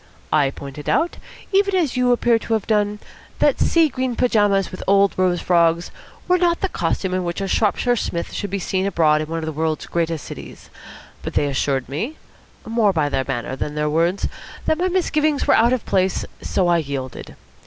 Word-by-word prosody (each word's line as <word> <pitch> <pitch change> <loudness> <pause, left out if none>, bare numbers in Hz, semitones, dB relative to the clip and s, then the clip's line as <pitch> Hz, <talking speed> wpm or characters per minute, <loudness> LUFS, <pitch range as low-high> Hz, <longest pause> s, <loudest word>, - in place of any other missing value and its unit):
I 145 -3 +4
pointed 140 +1 -7
out, 340 - +1 0.4
even 400 0 +3
as 320 -9 +1
you 250 0 +3
appear 240 -1 +3
to 225 - -3
have 220 -3 0
done, 210 -1 +1 0.4
that - - +2
sea 330 -1 +4
green 255 -3 -2
pyjamas 205 -6 +2
with 185 - -7
old 200 0 +4
rose 180 -2 +1
frogs 170 -1 +2 0.4
were 360 0 +3
not 345 -1 +2
the 390 - 0
costume 190 - -1
in 185 0 0
which 175 -1 -3
a 195 - -2
Shropshire 225 +4 +1
Psmith 170 -6 -3
should 205 - -3
be 200 - -2
seen 190 +1 -1
abroad 155 -5 +3
in 155 - -4
one 165 +1 -3
of 160 - -3
the 160 - -3
world's 155 0 -2
greatest 165 -2 -2
cities; - - -10 0.5
but - - -6
they - - +2
assured 135 -1 -1
me 220 - -4 0.5
more 225 -2 +2
by 155 -5 0
their 135 -2 -1
manner 130 -1 -3
than 150 +2 -4
their 150 0 0
words 170 +5 +1 0.4
that 315 - +1
my 365 - +2
misgivings 310 -5 +1
were - - +4
out 235 +2 +4
of 255 -3 -1
place, 185 -1 +1 0.2
so 185 - 0
I 170 -1 +3
yielded. 135 -4 -6
190 Hz, 200 wpm, -21 LUFS, 160-240 Hz, 0.5 s, I